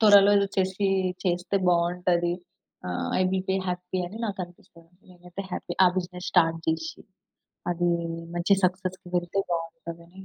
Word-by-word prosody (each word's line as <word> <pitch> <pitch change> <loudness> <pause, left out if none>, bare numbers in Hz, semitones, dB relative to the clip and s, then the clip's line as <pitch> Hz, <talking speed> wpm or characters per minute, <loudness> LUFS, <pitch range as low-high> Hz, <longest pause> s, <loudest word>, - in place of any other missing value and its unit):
త్వరలో 205 -2 +8
ఏదో 200 - +2
చేసి 190 +1 +1 0.4
చేస్తే 180 +2 +1
బాగుంటది. 175 0 +2 0.6
ఆహ్, 90 - -2
ఐ - - +5
విల్ 190 0 -1
బి - - +2
హ్యాపీ 180 +1 -3
అని 210 +5 -8
నాకనిపిస్తుంది. 175 -3 -8 0.2
నేనైతే 180 +2 -8
హ్యాపీ - - -4
ఆ - - +8
బిజినెస్ 180 0 -3
స్టార్ట్ 165 -2 +4
జేసి, 160 0 -2 0.7
అది 175 0 +1 0.5
మంచి 195 +3 +4
సక్సెస్‌కి 185 0 -1
వెళ్తే 175 +2 -1
బావుంటదని 170 +1 -5
180 Hz, 135 wpm, -27 LUFS, 170-190 Hz, 0.7 s, త్వరలో